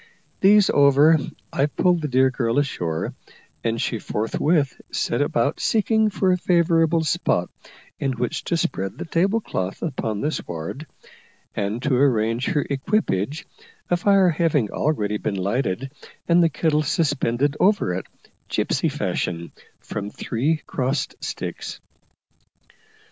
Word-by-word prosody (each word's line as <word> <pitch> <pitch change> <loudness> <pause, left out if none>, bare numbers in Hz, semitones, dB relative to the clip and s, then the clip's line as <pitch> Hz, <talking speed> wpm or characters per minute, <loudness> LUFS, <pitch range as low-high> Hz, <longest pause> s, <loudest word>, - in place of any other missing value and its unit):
These 205 +1 +5
over, 145 +3 +5 0.3
I 140 - +2
pulled 175 +2 +1
the 150 - -1
dear 130 0 +3
girl 120 -2 -1
ashore, 85 - -1 0.5
and 115 0 -1
she 115 - -1
forthwith 140 +9 0
set - - 0
about - - 0
seeking 220 -1 +2
for 190 -2 +1
a 180 - +1
favourable 165 -2 +3
spot 145 - 0 0.5
in 135 -2 0
which 120 0 -3
to 170 - 0
spread 95 - -2
the - - -5
table 190 +7 +1
cloth 95 - -4
upon 115 -9 -2
the 150 - 0
sward, 85 - -6 0.7
and 105 +5 -2
to 140 - +1
arrange 120 -2 +2
her 145 - 0
equipage, 140 - -1 0.5
a - - +5
fire 195 +1 +4
having 150 - +1
already 105 -9 0
been 100 - -2
lighted 105 +5 -1 0.4
and 170 +1 +5
the 165 - +4
kettle 155 0 +1
suspended 145 -3 0
over 195 - +3
it, 90 - -4 0.4
gipsy - - 0
fashion, 85 -1 -3 0.3
from 105 -1 -5
three 145 +10 -1
crossed 130 +1 -2
sticks. - - -5
140 Hz, 130 wpm, -23 LUFS, 115-165 Hz, 0.7 s, These